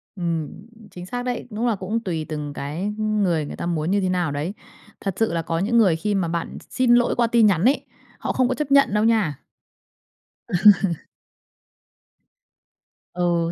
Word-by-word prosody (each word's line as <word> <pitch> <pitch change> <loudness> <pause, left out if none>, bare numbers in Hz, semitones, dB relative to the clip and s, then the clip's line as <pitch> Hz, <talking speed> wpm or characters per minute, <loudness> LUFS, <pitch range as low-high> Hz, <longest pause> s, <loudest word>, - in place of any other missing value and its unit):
Ừm, 165 -5 -2 0.4
chính 180 0 -9
xác 245 +5 -4
đấy, 245 -1 -3
đúng 225 +3 -2
là 230 - +2
cũng 200 +4 -2
tùy 165 -7 -3
từng 150 -2 -4
cái 145 +6 -5
ng 215 -1 0
người 165 -5 +1
người - - -7
ta - - -5
muốn 170 0 -1
như 200 0 +2
thế 185 - 0
nào 175 -5 0
đấy. 150 +7 -3 0.5
Thật 195 -3 -2
sự 225 -5 +1
là 165 - 0
có 165 +1 -2
những 235 +5 +1
người 190 -8 +5
khi 205 +5 -1
mà 185 -4 0
bạn 170 0 -4
x - - -18
xin 245 -2 +3
lỗi 240 0 +2
qua 235 -1 +2
tin 230 -1 +4
nhắn 190 -2 +2
ấy, 270 +4 +2 0.3
họ - - -2
không 255 -1 +2
có 255 - -1
chấp 300 -2 -4
nhận 275 -6 +5
đâu 210 +1 +2
nha. 210 - +1 1.1
Ừ. 210 - -2 2.6
Ừ, 170 -1 0
190 Hz, 195 wpm, -23 LUFS, 165-230 Hz, 2.6 s, người